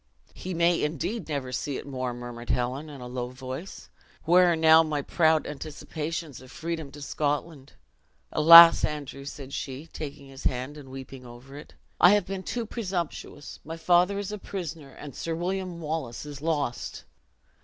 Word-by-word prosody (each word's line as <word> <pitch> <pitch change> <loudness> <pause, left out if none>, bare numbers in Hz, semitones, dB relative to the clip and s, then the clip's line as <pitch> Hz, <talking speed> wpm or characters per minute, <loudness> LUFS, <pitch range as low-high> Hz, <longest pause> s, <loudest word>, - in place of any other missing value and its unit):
"He 185 -1 -6
may 170 +1 +3
indeed 165 - -3
never 140 -4 -3
see 135 +2 -3
it - - -8
more!" 130 -3 -3
murmured 120 -1 -8
Helen, 125 +5 -1
in 140 -3 -10
a 125 - -7
low 125 0 -4
voice. 130 +7 -8 0.4
"Where 175 +1 +5
are - - +2
now 160 0 +7
my 150 -3 -2
proud 160 0 +2
anticipations 155 0 -5
of 130 - -14
freedom 160 -3 -4
to 145 0 -9
Scotland? 145 -1 -3 0.6
Alas, 165 +2 +10
Andrew," 140 -2 -4
said 140 -1 -8
she, 135 +3 -5
taking 140 -3 -8
his 135 0 -12
hand, 130 +3 -1
and 145 -3 -11
weeping 130 0 -9
over 125 +3 -12
it. 150 - -12 0.2
"I 180 - +8
have 205 - +1
been 195 0 -4
too 235 +4 -3
presumptuous; 180 -9 -5
my 165 +2 -7
father 180 +4 +3
is 200 0 -4
a 210 - -5
prisoner, 165 -7 -6
and 140 0 -10
Sir 165 +5 -3
William 180 0 -3
Wallace 155 -6 -4
is 145 -2 -8
lost!" 145 -7 -2
150 Hz, 170 wpm, -27 LUFS, 135-170 Hz, 0.6 s, Alas